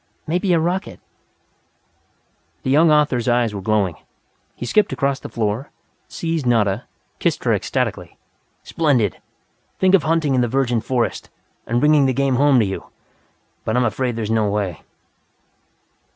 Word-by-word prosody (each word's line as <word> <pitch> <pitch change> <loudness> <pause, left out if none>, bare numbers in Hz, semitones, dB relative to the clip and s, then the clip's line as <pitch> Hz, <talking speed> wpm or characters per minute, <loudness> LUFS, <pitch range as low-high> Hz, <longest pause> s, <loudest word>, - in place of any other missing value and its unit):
Maybe 180 +4 0
a 170 - +4
rocket 180 +4 -2 0.8
" 80 +3 -43
The 130 - -1
young 155 +3 +5
author's 145 -6 +2
eyes 120 -2 +2
were 100 - -5
glowing. 100 -4 0 0.6
He - - -6
skipped 205 - +2
across 140 0 -1
the - - -9
floor, 110 +4 -2 0.4
seized 165 -2 -3
Nada, 110 -2 +1 0.3
kissed - - 0
her - - +2
ecstatically. - - -2 0.5
"Splendid! 130 - 0 0.6
Think 190 0 +3
of 195 - +6
hunting 155 -1 +1
in 130 - +2
the 120 - +1
virgin 125 -2 0
forest, 120 +1 -2 0.4
and 120 +1 +1
bringing 150 0 +4
the 130 - +1
game 135 -1 +1
home 140 0 +4
to - - +2
you! 95 -1 -5 0.8
But 110 +2 -1
I'm 125 - +3
afraid 120 +2 -1
there 115 - -3
is 110 - -3
no 110 -2 +2
way. 100 -9 -2
125 Hz, 155 wpm, -20 LUFS, 110-150 Hz, 0.8 s, of